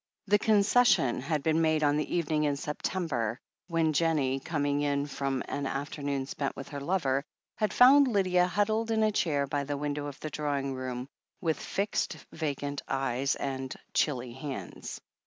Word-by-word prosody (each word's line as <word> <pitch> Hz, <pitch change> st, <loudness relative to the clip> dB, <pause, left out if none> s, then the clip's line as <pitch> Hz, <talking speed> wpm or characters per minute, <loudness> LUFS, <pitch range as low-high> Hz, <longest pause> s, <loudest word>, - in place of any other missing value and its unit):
The 205 Hz, +1 st, +4 dB
concession 200 Hz, -, +4 dB
had 150 Hz, +1 st, -1 dB
been 160 Hz, +1 st, +2 dB
made 155 Hz, -1 st, +2 dB
on 145 Hz, 0 st, +3 dB
the 150 Hz, +2 st, -1 dB
evening 155 Hz, -3 st, +1 dB
in 145 Hz, -1 st, +1 dB
Sep 150 Hz, +1 st, -5 dB
tember, 125 Hz, -, -1 dB, 0.3 s
when 165 Hz, -3 st, +1 dB
Jennie, 145 Hz, -4 st, +2 dB
coming 145 Hz, -1 st, -1 dB
in 145 Hz, -1 st, +1 dB
from 135 Hz, -2 st, -2 dB
an 140 Hz, -1 st, -2 dB
afternoon 140 Hz, 0 st, -3 dB
spent 140 Hz, 0 st, -3 dB
with 135 Hz, -, -8 dB
her 145 Hz, -, -5 dB
lover, 140 Hz, -5 st, +1 dB, 0.3 s
had 215 Hz, -3 st, +1 dB
found 275 Hz, +4 st, +7 dB
Lydia 185 Hz, -5 st, +3 dB
huddled 215 Hz, +4 st, +1 dB
in 220 Hz, -1 st, +2 dB
a 215 Hz, -, +3 dB
chair 145 Hz, -8 st, +1 dB
by 140 Hz, +1 st, -1 dB
the 145 Hz, +1 st, -3 dB
window 145 Hz, 0 st, -2 dB
of 145 Hz, -1 st, -8 dB
the 155 Hz, -, -5 dB
drawing 140 Hz, -2 st, -1 dB
room, 130 Hz, -1 st, -4 dB, 0.3 s
with 160 Hz, -3 st, 0 dB
fixed, 200 Hz, -3 st, -1 dB
vacant 145 Hz, -2 st, -3 dB
gaze 135 Hz, 0 st, 0 dB
and 135 Hz, -1 st, -4 dB, 0.2 s
chilly 125 Hz, -5 st, 0 dB
hands. 135 Hz, +1 st, -6 dB
145 Hz, 170 wpm, -29 LUFS, 135-170 Hz, 0.3 s, found